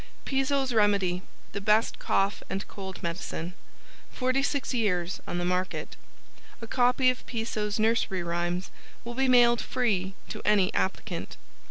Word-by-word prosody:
PISO'S 270 -1 +1
REMEDY 200 -4 +3 0.3
the 200 - -4
Best 215 +3 +3
Cough 195 +1 +1
and 195 +1 -3
Cold 190 -2 -8
Medicine. 170 0 -4 0.6
46 270 +2 0
Years 190 -6 0
on - - -2
the 175 - -1
Market. 180 +1 -1 0.6
A 230 - -7
copy 250 +2 +3
of 255 - -8
Piso's 220 -3 -2
Nursery 220 -4 +1
Rhymes 175 +2 -2 0.3
will 240 0 -5
be 265 +2 +1
mailed 240 -2 +6
free 195 -7 0
to - - -5
any 205 -3 +3
applicant. 95 -1 -2
210 Hz, 135 wpm, -28 LUFS, 185-245 Hz, 0.6 s, mailed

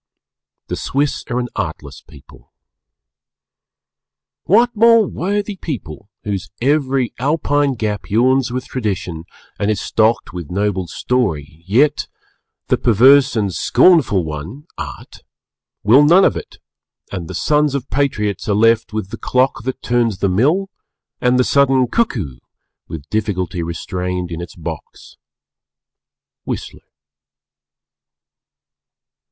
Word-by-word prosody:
The - - -4
Swiss 140 +2 -1
are 120 - -1
an 125 -1 -2
Artless - - -5
people. 75 -4 -18 1.9
"What 235 +5 +3
more 230 0 +5
worthy 200 +3 -3
people! 105 - -7
Whose 100 -2 -4
every 135 -2 +1
Alpine 145 0 +1
gap 105 -3 -3
yawns 125 +4 +2
with 125 0 -3
tradition, 95 -9 -4 0.3
and 100 - 0
is 105 - 0
stocked 110 -3 +1
with 85 -4 -7
noble 95 -1 -1
story, 80 - -2
yet, 130 +10 +2 0.6
the - - +1
perverse 130 +5 +5
and 100 -4 0
scornful 135 - +4
one 80 - -7
(Art) - - -8 0.6
will 125 +8 +6
none 175 +6 +6
of - - +2
it, - - -8 0.5
and 90 -4 -5
the - - -7
sons 150 -1 +1
of 135 -1 -3
patriots 105 -9 -1
are 100 - +2
left 115 +1 +3
with 110 -2 -4
the 115 - -5
clock 130 +1 +1
that 130 0 -4
turns 120 -4 +1
the 100 - 0
mill, 155 - +1 0.5
and 125 0 +3
the 125 - +4
sudden 135 -1 +3
cuckoo, 115 - -2 0.5
with 80 -3 -8
difficulty 95 -5 -2
restrained 90 +2 -4
in 85 0 -5
its 85 -3 -9
box." - - -9 1.3
_Whistler. - - -6
115 Hz, 120 wpm, -18 LUFS, 95-140 Hz, 1.9 s, will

